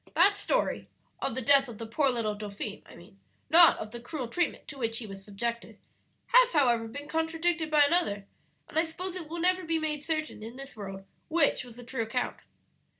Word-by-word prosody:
"That 385 +5 +6
story 405 - -1 0.3
(of - - -1
the 260 - -3
death 275 +2 +5
of 235 -3 -9
the 230 - -6
poor 275 +5 +1
little 230 -4 0
dauphin, 205 0 -6
I - - -14
mean, 190 +4 -16 0.3
not 335 +1 +8
of 215 - -6
the 240 - -7
cruel 255 +1 -5
treatment 345 +7 -1
to 280 - -8
which 225 -2 0
he 230 - -1
was 195 -1 -9
subjected) 235 +4 -4 0.6
has, - - +6
however, 240 -7 +3
been 285 +5 -7
contradicted 325 +1 0
by 300 -1 +6
another; 285 - +1 0.4
and 315 - 0
I - - +4
suppose 355 +3 -5
it 335 -4 -6
will 340 - -5
never 365 +2 +1
be 325 0 0
made 305 -2 -2
certain 310 -6 -2
in 225 +3 -8
this 275 +1 -9
world 195 -2 -7 0.2
which 315 -5 +2
was 240 -2 -12
the 245 - -9
true 240 0 -4
account. 230 +3 -2
275 Hz, 210 wpm, -29 LUFS, 225-325 Hz, 0.6 s, not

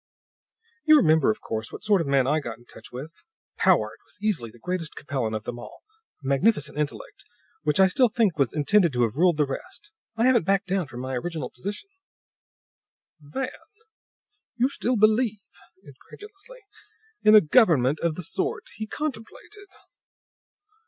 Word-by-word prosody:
"You 310 -1 +7
remember, 160 - +4
of 110 - -1
course, 110 0 -5
what - - -9
sort 205 -4 +3
of 160 - -4
a - - -3
man 135 -2 +3
I 150 +4 +1
got 120 -6 -7
in 120 - -21
touch - - -14
with. 145 +7 -10 0.4
Powart - - +2
was - - -19
easily 200 - -1
the 115 - -17
greatest 175 +3 -4
Capellan 125 -6 -3
of 110 - -4
them 120 +1 -6
all; - - -12 0.4
a - - -6
magnificent 145 +2 +1
intellect, 150 -1 -5 0.4
which 150 +2 0
I 190 - +8
still 240 +6 +3
think 215 -6 +1
was 135 -4 +2
intended 170 +2 +2
to 125 -1 +1
have 110 -3 -1
ruled 175 +1 +3
the 150 - +3
rest. 275 - -8 0.3
I 230 - +2
haven't 255 -3 +4
backed 195 0 +2
down 190 -4 -1
from 120 +1 -8
my 130 +1 -5
original 160 +5 -4
position." 205 - -7 1.3
"Van! 205 - -4 1.1
You 245 +3 +2
still 250 -3 -1
believe," 215 0 +2 0.4
incredulously, 415 - -14 0.6
"in 215 0 +6
a - - +11
government 155 - +3
of 170 -2 -1
the 180 - -5
sort 175 - -2
he 220 - -5
contemplated?" 310 - -7
170 Hz, 165 wpm, -25 LUFS, 140-220 Hz, 1.3 s, a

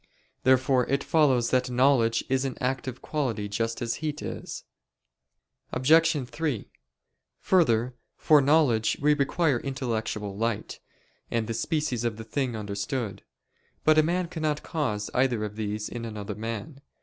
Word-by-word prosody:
Therefore 130 -1 +3
it 140 +1 0
follows 140 -8 +3
that 130 0 +2
knowledge 125 -3 +3
is 130 0 +1
an 135 -1 -3
active 130 0 -3
quality 120 -9 -2
just 115 +3 -2
as 115 - -2
heat 155 -1 -2
is. - - -6 1.1
Obj. 155 +1 +3
3: 150 -6 -3 0.7
Further, 125 -9 +3 0.2
for 150 -2 +5
knowledge 135 -6 +3
we 150 +1 +4
require 145 -1 +1
intellectual 115 -7 -3
light, 115 0 -2 0.5
and 115 -1 0
the 115 - -3
species 150 -2 -1
of 115 -2 -1
the 110 - -7
thing 125 +1 -2
understood. 105 +2 -3 0.6
But 155 0 +5
a - - +8
man 175 +3 0
cannot 155 -3 -2
cause 115 -10 -2
either 125 -4 +1
of 105 0 -7
these 105 0 -3
in 120 -1 -6
another 105 -3 -5
man. 115 +6 -6
125 Hz, 140 wpm, -27 LUFS, 115-145 Hz, 1.1 s, a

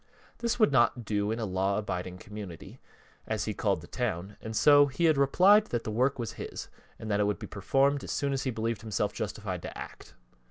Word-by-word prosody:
This 235 -1 0
would 215 -10 +4
not 120 -2 +3
do 105 -1 0
in 110 - -1
a 115 - -2
law 95 +1 0
abiding 90 -3 -4
community, 100 -4 -9 0.5
as 110 - -1
he 110 - -2
called 100 -5 0
the 85 - -12
town, 100 -5 -3
and 110 0 -6
so 145 +3 +6
he 140 +5 -1
had 160 -2 +5
replied 185 +10 +5
that 120 -1 -2
the 110 - -4
work 130 +5 +1
was 115 -4 -4
his, - - -6 0.3
and 110 - -8
that 100 - +1
it 105 - +2
would 105 -2 0
be - - -7
performed 135 +7 +1
as - - -8
soon 140 -1 0
as 135 - -1
he 135 - -1
believed 115 -1 -2
himself 110 -2 -1
justified - - -4
to - - -7
act. - - -10
115 Hz, 225 wpm, -29 LUFS, 100-140 Hz, 0.5 s, so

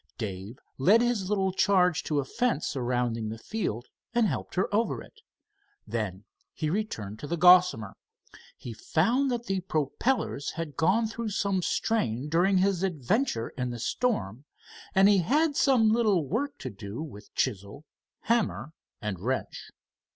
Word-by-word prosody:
Dave 100 +1 -6 0.2
led 200 +12 +5
his 235 -6 0
little 195 -2 +1
charge 180 -3 +3
to 155 - -2
the 140 - 0
fence 235 - 0
surrounding 120 -3 -1
the 110 - -5
field 120 - -3 0.3
and 235 -1 +4
helped - - -3
her 185 - +1
over 225 +3 +1
it. 445 - -19 0.6
Then 105 -4 -4 0.3
he 155 -1 -2
returned 110 - -3
to 145 - -6
the 170 - -2
Gossamer. 180 - +5 0.6
He 120 - -8
found 230 - +1
that 240 -1 -2
the 195 -3 -1
propellers 160 - -1
had 160 -4 -5
gone 195 - +2
through 225 +1 -4
some 200 -2 0
strain 150 - -1
during 180 +5 +3
his 190 -1 +2
adventure 180 - 0
in 125 -1 -4
the 120 - -5
storm, 125 - -2 0.5
and 190 +1 +6
he 205 -1 +5
had 290 - +2
some 245 -7 +4
little 215 -8 +2
work 285 - -2
to 130 - -6
do 100 +3 -8
with 105 -9 -11
chisel, 105 +4 -2 0.4
hammer 225 -8 0 0.3
and 100 -4 -3
wrench. 130 +7 -3
170 Hz, 150 wpm, -28 LUFS, -, 0.6 s, and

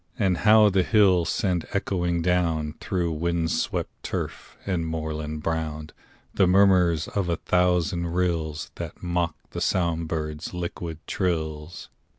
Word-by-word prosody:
And 95 -4 +2
how 105 0 +6
the 95 0 +3
hills 95 -5 +4
send 90 -4 0
echoing 90 -4 0
down, 85 -4 +1
Through 90 -3 -1
wind 85 +1 -1
swept - - -2
turf - - -5
and 85 -4 -1
moorland 80 -1 -4
brown, 80 -1 -3 0.4
The 95 - +3
murmurs 90 -4 +4
of 100 -4 -1
a 85 - +2
thousand 90 0 +1
rills 85 -3 -1
That - - -7
mock 85 -2 0 0.2
the - - -5
song 85 -2 +1
birds' 75 +1 -4
liquid 85 -2 -5
trills! 80 -3 -3
85 Hz, 135 wpm, -25 LUFS, 80-90 Hz, 0.4 s, how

